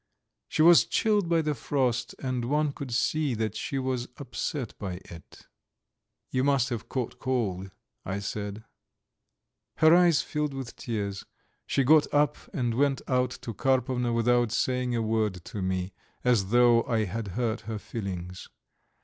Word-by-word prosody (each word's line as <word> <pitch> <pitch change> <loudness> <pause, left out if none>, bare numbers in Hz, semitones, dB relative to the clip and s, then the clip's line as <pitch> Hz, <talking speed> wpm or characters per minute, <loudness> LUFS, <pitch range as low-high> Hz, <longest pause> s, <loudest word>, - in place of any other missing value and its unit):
She 155 - +2
was 170 0 +8
chilled 210 -5 +1
by 165 -1 +3
the 150 0 0
frost 125 -2 -1
and 130 -3 -2
one 150 +3 +1
could 140 -2 -7
see 135 +3 +1
that 110 -1 -2
she 135 - -3
was 130 -2 -2
upset 135 -1 -4
by 95 -3 -4
it. 85 -1 -13 0.9
"You 130 - +1
must 140 -2 +2
have 120 -3 -5
caught 125 -3 -3
cold," 100 -8 -1 0.3
I 95 +1 -3
said. 100 +1 -5 1.1
Her 160 +1 +6
eyes 175 -4 +4
filled 150 -2 -2
with 130 -3 -6
tears; 100 -4 -4 0.4
she 135 - +2
got 150 +3 +5
up 145 0 +3 0.2
and 125 - -1
went 135 +2 +1
out 125 -1 +2
to 115 - -5
Karpovna 125 0 +1
without 120 0 +2
saying 125 0 0
a 115 - 0
word 110 -5 -1
to 105 - -6
me, 95 0 -2 0.3
as 120 -6 +3
though 120 0 +5
I 115 -2 +1
had 105 +2 -4
hurt 120 -2 -1
her 110 - -2
feelings. 90 -4 -6
120 Hz, 155 wpm, -28 LUFS, 110-135 Hz, 1.1 s, was